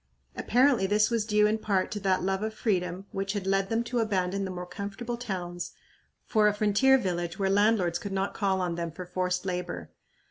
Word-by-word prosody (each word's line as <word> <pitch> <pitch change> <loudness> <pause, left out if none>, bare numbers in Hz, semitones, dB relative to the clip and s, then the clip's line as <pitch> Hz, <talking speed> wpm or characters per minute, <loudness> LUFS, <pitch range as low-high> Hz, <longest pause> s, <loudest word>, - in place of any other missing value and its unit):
Apparently 250 -4 +3
this 210 +3 +3
was 225 -2 0
due 210 -1 +4
in 215 +1 +1
part 195 -4 0
to 205 - -3
that 190 -2 +1
love 190 +1 0
of 220 0 -3
freedom 180 -3 -1
which 195 0 -2
had 200 -3 -3
led 195 0 +1
them 230 +1 +1
to 240 +1 -2
abandon 195 -3 0
the - - -4
more 180 -1 -5
comfortable 205 +5 -5
towns 180 -7 -5 0.5
for 215 -2 +3
a 210 - +2
frontier 215 +6 +4
village 175 -5 -2
where 195 -2 +1
landlords 200 -4 +3
could 200 - -6
not 195 +1 -1
call 190 -2 0
on 180 -2 -1
them 170 0 -3
for 180 +3 -8
forced 180 0 -1
labor. 180 - -4
195 Hz, 205 wpm, -28 LUFS, 180-215 Hz, 0.5 s, due